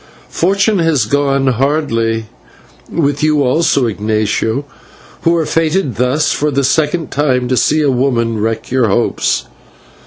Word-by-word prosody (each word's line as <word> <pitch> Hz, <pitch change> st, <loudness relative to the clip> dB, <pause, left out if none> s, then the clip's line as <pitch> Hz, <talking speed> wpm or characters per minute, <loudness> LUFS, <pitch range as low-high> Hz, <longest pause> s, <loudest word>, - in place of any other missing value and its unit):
Fortune 195 Hz, +3 st, +1 dB
has 160 Hz, -8 st, +2 dB
gone 140 Hz, +2 st, +1 dB
hardly 120 Hz, -4 st, 0 dB, 0.7 s
with 145 Hz, -3 st, 0 dB
you 150 Hz, -2 st, +2 dB
also, 140 Hz, +1 st, +2 dB
Ignatio, 110 Hz, +4 st, -1 dB, 0.6 s
who 170 Hz, 0 st, +2 dB
are 165 Hz, -2 st, 0 dB
fated 160 Hz, -, 0 dB
thus 125 Hz, +5 st, +1 dB
for 150 Hz, -, 0 dB
the 140 Hz, -1 st, 0 dB
second 155 Hz, +4 st, 0 dB
time 130 Hz, -4 st, 0 dB
to 130 Hz, -, +1 dB
see 155 Hz, +4 st, +2 dB
a 140 Hz, -, +2 dB
woman 120 Hz, -3 st, 0 dB
wreck 115 Hz, +2 st, -3 dB
your 130 Hz, -2 st, +2 dB
hopes. 95 Hz, -, 0 dB
140 Hz, 135 wpm, -14 LUFS, 115-155 Hz, 0.7 s, has